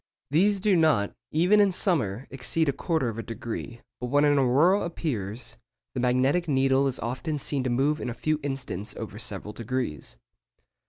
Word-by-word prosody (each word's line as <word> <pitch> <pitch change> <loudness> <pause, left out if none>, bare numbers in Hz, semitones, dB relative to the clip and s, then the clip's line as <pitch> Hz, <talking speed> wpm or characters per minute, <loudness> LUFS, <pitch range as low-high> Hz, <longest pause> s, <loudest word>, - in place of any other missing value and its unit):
These 195 +6 +3
do 195 0 +3
not, 155 - +3 0.2
even 180 +7 +4
in 200 -2 +5
summer, 135 - 0
exceed 135 +5 +1
a 140 - +2
quarter 155 -1 -1
of 115 -1 -4
a - - -1
degree, 115 +1 -6 0.2
but 125 - -3
when 145 +3 +3
an 145 -1 +4
aurora 145 +10 +4
appears, 120 - -3 0.4
the 130 - -3
magnetic 130 +7 +2
needle 135 -1 +3
is 130 - -2
often 130 +6 -3
seen 140 -1 -1
to - - +1
move 140 +5 +1
in - - -3
a 120 - -5
few 155 +4 0
instants 135 -8 -4
over - - -7
several 105 - -4
degrees. 115 - -4
135 Hz, 175 wpm, -27 LUFS, 120-160 Hz, 0.4 s, in